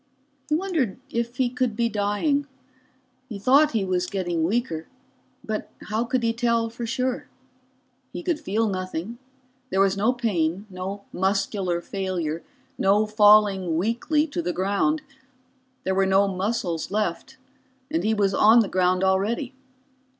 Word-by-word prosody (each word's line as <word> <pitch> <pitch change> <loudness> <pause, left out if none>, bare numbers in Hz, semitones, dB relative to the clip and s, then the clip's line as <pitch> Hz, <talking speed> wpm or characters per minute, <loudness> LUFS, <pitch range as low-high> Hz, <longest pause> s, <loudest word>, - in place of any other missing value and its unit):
He 305 - +3
wondered 320 - -1
if 235 +1 -2
he 255 -1 +2
could 250 -2 -1
be 235 +1 +1
dying. 230 +8 0 0.8
He 215 - -5
thought 275 +8 +4
he 215 -4 +1
was 180 -1 0
getting 175 -4 -1
weaker 170 -4 -1 0.6
but 215 -1 -4 0.2
how 220 +3 0
could 250 0 -1
he 230 0 +2
tell 230 -1 0
for 235 0 -5
sure? 250 +2 -2 0.8
He - - -6
could 340 -3 0
feel 225 -6 0
nothing, 185 +3 -4 0.5
there 190 - 0
was 195 0 +4
no 210 +5 +2
pain, 200 -7 -1
no 190 +2 -5
muscular 190 -2 0
failure, 175 -5 -3 0.4
no 205 +2 +3
falling 205 -5 +4
weakly 240 - +1
to 290 - -3
the 175 +1 -2
ground. 205 - 0 0.8
There 190 - 0
were 195 0 +2
no 195 +1 +4
muscles 190 -3 -2
left 205 +1 -2 0.5
and 325 - 0
he 220 +1 +2
was 200 -2 +1
on 220 +4 +6
the 215 - -1
ground 185 0 +2
already. 205 +8 0
210 Hz, 145 wpm, -24 LUFS, 190-235 Hz, 0.8 s, on